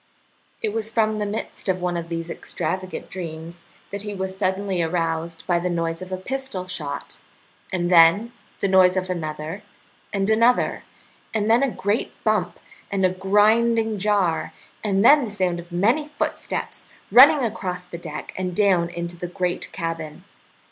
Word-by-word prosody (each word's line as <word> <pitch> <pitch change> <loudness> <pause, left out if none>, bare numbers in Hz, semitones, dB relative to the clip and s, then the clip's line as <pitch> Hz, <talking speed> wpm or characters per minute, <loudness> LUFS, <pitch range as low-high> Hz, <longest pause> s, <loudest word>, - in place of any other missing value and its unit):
It 215 - -1
was 220 -1 -1
from 220 -1 +1
the 210 - -1
midst 205 -1 -4
of 185 -1 +1
one 180 -1 -1
of 170 -1 -4
these 165 0 -4
extravagant 185 +3 -4
dreams 170 -1 -7 0.3
that 200 0 -4
he 210 0 -5
was 190 0 -4
suddenly 190 -1 -1
aroused 165 0 -2
by 175 -2 +2
the 180 +1 -2
noise 165 0 -2
of 185 0 -8
a 185 - -2
pistol 265 -2 -4
shot, 160 -6 -5 0.5
and 175 -1 -1
then 180 +7 +6 0.3
the - - +2
noise 185 -1 +5
of 185 0 -1
another 155 +2 -4 0.5
and 195 -1 0
another, 230 +3 +3 0.5
and 215 0 +2
then 235 +3 +5
a 275 - +2
great 210 0 -1
bump - - 0 0.3
and 195 -1 +2
a - - +4
grinding 215 +3 +3
jar, 195 -5 +1 0.3
and 200 0 +2
then 290 +2 +7
the 230 - -3
sound 185 -4 -1
of 170 +1 -11
many 230 - +2
footsteps 295 - -4 0.2
running 280 +3 +8
across 185 -5 -3
the 175 -1 -9
deck 155 -3 -7
and 180 -1 -3
down 185 -4 +3
into 170 0 -5
the 175 +1 -5
great 180 0 -3
cabin. 165 -3 -5
185 Hz, 165 wpm, -23 LUFS, 170-210 Hz, 0.5 s, running